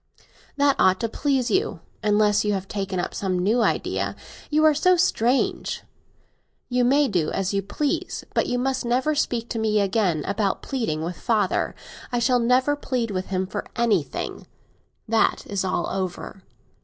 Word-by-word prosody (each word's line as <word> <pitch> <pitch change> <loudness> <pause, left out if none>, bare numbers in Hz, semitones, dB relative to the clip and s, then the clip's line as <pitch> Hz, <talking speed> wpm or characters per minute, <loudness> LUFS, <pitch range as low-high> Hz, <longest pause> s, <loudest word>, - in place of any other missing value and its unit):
That 280 -1 +4
ought 185 0 +4
to 230 - +1
please 265 +1 0
you, 380 - 0 0.2
unless 210 -1 +3
you 210 -1 +1
have 195 -1 -3
taken 195 -2 -3
up - - -3
some 190 -2 -1
new 210 +7 +2
idea; - - 0 0.3
you 310 +1 +3
are 310 - +6
so 365 +5 +4
strange. 255 -7 +1 0.9
You 250 0 +2
may 280 +4 +4
do 175 -8 0
as 195 0 -1
you 200 - +1
please; 240 +9 -2
but - - +1
you 245 - 0
must 265 +1 -1
never 255 +6 +1
speak 240 -6 -1
to 230 - -2
me 215 -1 +2
again 195 -6 +1
about 200 0 -1
pleading 220 - -2
with 175 +1 -4
father. 220 -3 0 0.4
I 245 - 0
shall 245 +1 +3
never 255 +4 +3
plead 250 -6 -2
with 185 -1 -3
him 190 0 -1
for 185 - -4
anything; 210 - -1 0.6
that 225 0 +2
is 200 -2 -2
all 185 -2 -1
over. 190 0 -4
220 Hz, 165 wpm, -24 LUFS, 195-255 Hz, 0.9 s, are